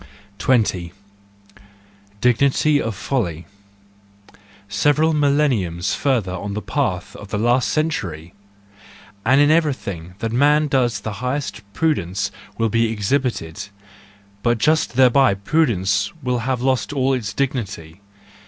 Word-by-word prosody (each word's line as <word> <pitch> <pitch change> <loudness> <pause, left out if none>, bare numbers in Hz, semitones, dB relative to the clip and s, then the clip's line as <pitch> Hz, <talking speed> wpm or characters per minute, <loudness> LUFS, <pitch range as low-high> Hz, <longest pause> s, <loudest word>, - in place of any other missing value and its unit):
20. 95 -9 +1 1.3
Dignity 140 +4 +3
of 115 -2 -3
Folly 90 - -2 1.2
.—Several 145 +10 +2
millenniums 135 - +1
further 125 -10 0
on 95 +2 -5
in 100 - -4
the 105 - -3
path 105 -12 -2
of 105 - -10
the 105 - -3
last 120 +4 +2
century!—and 95 - -2 1.1
in 145 0 +5
every¬ 155 -3 +3
thing 90 -5 -8
that 115 +1 -3
man 145 +5 +3
does 120 -6 +1
the 110 - -4
highest 130 -2 -3
prudence 100 - -1 0.3
will 115 0 +1
be 115 +1 +1
exhibited: 110 - -2 0.7
but 120 -1 +2
just 155 +3 +1
thereby 130 -3 +5
prudence 100 - +1
will 125 -1 0
have 125 +1 -2
lost 130 -1 0
all 135 -1 +1
its 115 -5 -2
dignity. 100 - -4
120 Hz, 120 wpm, -21 LUFS, 100-140 Hz, 1.3 s, in